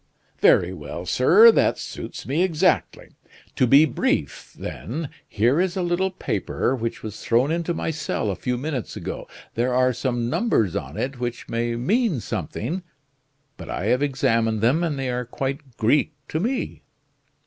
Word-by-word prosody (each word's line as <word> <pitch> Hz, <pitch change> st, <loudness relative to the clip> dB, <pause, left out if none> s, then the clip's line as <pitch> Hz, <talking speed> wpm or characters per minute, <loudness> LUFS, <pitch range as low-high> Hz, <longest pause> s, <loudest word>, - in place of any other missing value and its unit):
"Very -, -, +4 dB
well, -, -, -7 dB
sir, 460 Hz, +2 st, +7 dB
that -, -, +2 dB
suits -, -, -7 dB
me 145 Hz, +6 st, 0 dB
exactly. 180 Hz, 0 st, +1 dB, 0.5 s
To 130 Hz, -, +3 dB
be 140 Hz, +6 st, +7 dB
brief, 75 Hz, -, -1 dB
then 145 Hz, +5 st, -5 dB, 0.2 s
here 120 Hz, -, +2 dB
is 185 Hz, 0 st, -1 dB
a 185 Hz, -, 0 dB
little 175 Hz, +2 st, +1 dB
paper 130 Hz, -, -1 dB
which 115 Hz, -2 st, -4 dB
was 110 Hz, -1 st, -6 dB
thrown 125 Hz, +6 st, +2 dB
into 170 Hz, +1 st, -1 dB
my 165 Hz, -, -2 dB
cell 140 Hz, -8 st, -2 dB
a -, -, -3 dB
few 125 Hz, +4 st, -2 dB
minutes 135 Hz, -2 st, -4 dB
ago. -, -, -6 dB, 0.3 s
There 125 Hz, +2 st, 0 dB
are 130 Hz, 0 st, +3 dB
some 120 Hz, -1 st, -1 dB
numbers 155 Hz, -, +1 dB
on 65 Hz, +4 st, -4 dB
it 135 Hz, -1 st, -3 dB
which 120 Hz, 0 st, -4 dB
may 115 Hz, 0 st, -1 dB
mean 190 Hz, -, +1 dB
something; 140 Hz, -, -4 dB, 0.8 s
but -, -, -9 dB
I -, -, -3 dB
have 125 Hz, -, 0 dB
examined 115 Hz, -6 st, +1 dB
them, 135 Hz, +10 st, +3 dB
and 155 Hz, -4 st, -1 dB
they 130 Hz, -2 st, -2 dB
are 125 Hz, 0 st, -2 dB
quite 135 Hz, +1 st, -5 dB
Greek 140 Hz, +7 st, +2 dB, 0.2 s
to 155 Hz, -, -1 dB
me." 245 Hz, +8 st, -2 dB
135 Hz, 165 wpm, -23 LUFS, 120-165 Hz, 0.8 s, sir